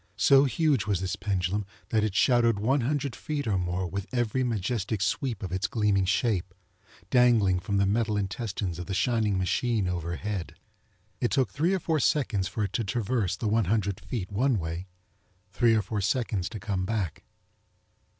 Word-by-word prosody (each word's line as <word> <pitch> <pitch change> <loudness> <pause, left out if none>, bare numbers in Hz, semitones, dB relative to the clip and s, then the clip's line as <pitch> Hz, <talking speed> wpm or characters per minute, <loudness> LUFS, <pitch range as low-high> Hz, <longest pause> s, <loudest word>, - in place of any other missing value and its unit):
So 140 0 +6
huge 140 -3 +1
was 100 -4 +1
this 95 0 -2
pendulum 100 0 -1 0.3
that 110 -2 +2
it 105 -3 -1
shadowed 120 -2 +4
one 130 +7 +1
hundred 140 0 -1
feet 150 -2 -3
or 105 -4 +1
more 90 +1 -2
with 100 +3 -4
every 120 0 0
majestic 110 -2 -1
sweep 115 - -1
of 95 - -4
its 95 +2 0
gleaming 105 -4 +1
shape, 95 -3 0 0.6
dangling 115 -7 +4
from 100 +3 -2
the 100 - +3
metal 105 +1 +1
intestines 100 -3 -3
of 90 - -6
the 95 - -2
shining 110 -3 +1
machine 105 +2 0
overhead. 85 0 -3 0.6
It 120 - +1
took 135 -2 +1
three 170 +6 +1
or - - -1
four 160 -2 0
seconds 120 -10 +1
for 110 - -3
it 100 -1 -3
to 115 - 0
traverse 105 -2 -1
the 110 - -2
one 110 0 +2
hundred 100 -1 0
feet 105 -8 -5
one 125 +4 +2
way, 85 +1 -4 0.6
three 115 +4 +3
or 110 - +2
four 105 +2 -3
seconds 105 -2 0
to 110 - -7
come 95 -2 -2
back. 95 -5 -2
105 Hz, 180 wpm, -27 LUFS, 95-120 Hz, 0.6 s, So